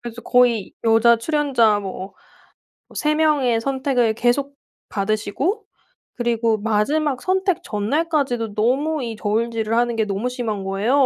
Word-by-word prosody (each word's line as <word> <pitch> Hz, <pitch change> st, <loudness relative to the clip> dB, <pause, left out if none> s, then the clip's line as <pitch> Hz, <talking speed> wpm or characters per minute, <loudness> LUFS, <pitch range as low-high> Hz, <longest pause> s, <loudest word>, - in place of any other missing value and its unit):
그래서 240 Hz, 0 st, -8 dB
거의 240 Hz, -5 st, +2 dB
여자 225 Hz, +1 st, +5 dB
출연자 235 Hz, -5 st, +2 dB
뭐 190 Hz, 0 st, -7 dB, 0.7 s
뭐 -, -, -18 dB
3 300 Hz, 0 st, +1 dB
명의 290 Hz, -7 st, +2 dB
선택을 260 Hz, -3 st, 0 dB
계속 275 Hz, +5 st, 0 dB, 0.3 s
받으시고 215 Hz, -, -2 dB, 0.5 s
그리고 230 Hz, -2 st, 0 dB
마지막 250 Hz, +7 st, 0 dB
선택 375 Hz, -1 st, 0 dB
전날까지도 245 Hz, 0 st, -1 dB
너무 270 Hz, +7 st, 0 dB
이 230 Hz, -1 st, -4 dB
저울질을 225 Hz, +1 st, -1 dB
하는 240 Hz, 0 st, +1 dB
게 225 Hz, -1 st, +1 dB
너무 200 Hz, +5 st, -2 dB
심한 225 Hz, -6 st, -4 dB
거예요. 200 Hz, +8 st, 0 dB
235 Hz, 290 characters per minute, -21 LUFS, 220-280 Hz, 0.7 s, 여자